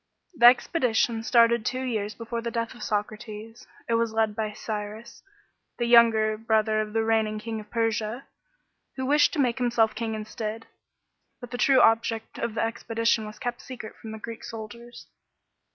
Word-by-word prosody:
The 240 -7 +7
expedition 240 -3 +3
started 235 -1 +4
two 255 +3 -2
years 215 -4 -2
before 230 0 -5
the 235 - -3
death 230 -1 -3
of 240 - -14
Socrates. 215 +2 -5 0.2
It 230 - 0
was 230 -1 +1
led 220 -1 +1
by 215 -1 -2
Cyrus, 215 +1 -6 0.6
the, 240 - 0
younger 225 -2 +5
brother 220 -1 +2
of 210 0 -5
the 225 0 +1
reigning 220 -1 +1
King 220 +1 -5
of 210 0 -11
Persia, 225 +1 -1 0.7
who 260 - -3
wished 290 +2 +4
to 320 - -2
make 250 -2 +1
himself 235 -3 +2
king 220 0 -3
instead. 215 +1 -5 0.7
But 245 -2 -10
the, 245 - -5
true 265 -2 +5
object 225 0 +2
of 230 -2 -3
the - - 0
expedition 230 -1 0
was 210 - -10
kept 245 0 -4
secret 240 -4 -9
from 220 - -10
the 220 - -6
Greek 225 +1 -8
soldiers. 235 +1 -9
225 Hz, 170 wpm, -26 LUFS, 215-235 Hz, 0.7 s, The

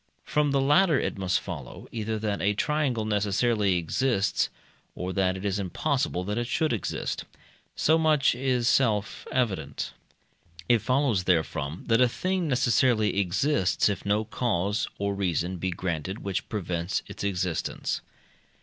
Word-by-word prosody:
From 150 -1 +1
the 140 0 +2
latter 150 +3 +4
it - - -2
must 95 -1 +1
follow, 75 -9 -8
either 110 -1 -2
that 105 -2 -2
a 105 +1 +2
triangle 135 -4 0
necessarily 105 -1 +1
exists, 100 +4 +1 0.5
or 90 +1 -4
that 95 -1 +1
it 95 - -7
is 100 0 0
impossible 130 - -1
that 105 +4 -2
it 120 - -2
should 155 +1 +1
exist. 105 - -3 0.5
So 160 +2 +3
much 155 -3 +3
is 125 -1 0
self 110 -6 +1
evident. 105 - -1 0.7
It 120 - +5
follows 125 -7 +1
therefrom 80 -3 0
that 115 +1 +3
a 125 - +5
thing 185 +6 -1
necessarily 120 -5 +2
exists, 100 +3 +2
if 100 -3 -3
no 105 +2 +1
cause 105 -3 0
or 100 0 -1
reason 90 -2 -1
be 95 +2 -2
granted 90 +2 -3
which 100 -2 -3
prevents 90 -3 -2
its - - -7
existence. 90 -4 -2
105 Hz, 145 wpm, -27 LUFS, 95-125 Hz, 0.7 s, It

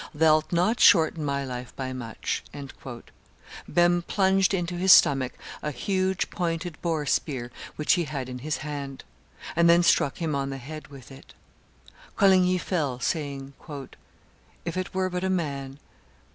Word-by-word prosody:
Thou'lt 155 0 +3
not 180 +8 +2
shorten 160 -1 +5
my 140 -1 -1
life 125 -1 -7
by 130 -1 -4
much." 120 -3 -4 1.3
Behme 175 +1 +3
plunged 195 -1 +3
into 175 -2 -1
his 185 +2 +4
stomach 135 -6 +6 0.3
a 150 - -2
huge 190 +6 -1
pointed 170 -2 -3
boar 160 -3 -1
spear 130 -4 -1 0.2
which 150 - +2
he 175 -2 +1
had 140 -4 -4
in 125 0 -6
his 150 +4 -2
hand, 140 -2 -6 0.5
and 170 0 +4
then 170 +1 +6
struck 140 -4 +3
him 160 -3 -2
on 135 -1 -1
the 135 - -4
head 155 +4 -9
with 135 -4 -13
it. 135 +2 -14 0.8
Coligny 185 -2 +4
fell, 150 -9 -2
saying, 140 -1 -3 1.1
"If 170 0 -3
it 185 0 -3
were 185 0 0
but 180 0 -3
a 190 - 0
man! 140 -7 -2
155 Hz, 150 wpm, -26 LUFS, 135-175 Hz, 1.3 s, stomach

